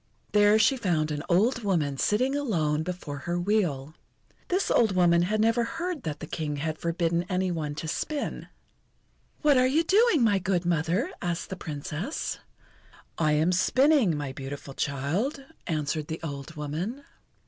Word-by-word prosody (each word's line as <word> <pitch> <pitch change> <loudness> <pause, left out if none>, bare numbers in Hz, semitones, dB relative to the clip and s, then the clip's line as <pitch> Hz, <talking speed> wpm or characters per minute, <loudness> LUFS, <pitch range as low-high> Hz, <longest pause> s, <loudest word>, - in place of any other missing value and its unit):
There 210 0 +5
she 225 +5 +4
found 165 -9 0
an 145 -1 -2
old 220 +8 +3
woman 160 -8 0
sitting 255 +6 +1
alone 160 - 0
before 160 -4 -5
her 175 +4 -2
wheel. 175 -8 0 0.5
This 370 +2 0
old 220 -5 +3
woman 170 -1 +4
had 210 +5 0
never 230 +2 +3
heard 340 +5 -3
that 150 -6 -5
the - - -4
King 150 -1 -3
had 155 +2 -3
forbidden 170 0 0
any 185 -1 0
one 150 -3 -3
to 160 - -5
spin. 290 - -3 1.0
"What 290 -3 +5
are 255 - +4
you 305 +6 +2
doing, 390 - +4
my 205 -3 +3
good 185 -2 0
mother?" 175 - 0
asked 175 0 -3
the - - -2
Princess. 165 - -4 0.8
"I 155 -2 +3
am 155 +4 +3
spinning, 255 - +3
my 140 -2 -4
beautiful 135 +1 -7
child," 160 - -2 0.2
answered 155 -2 -2
the 160 - -4
old 145 +1 -6
woman. 165 - -4
175 Hz, 160 wpm, -27 LUFS, 155-225 Hz, 1.0 s, There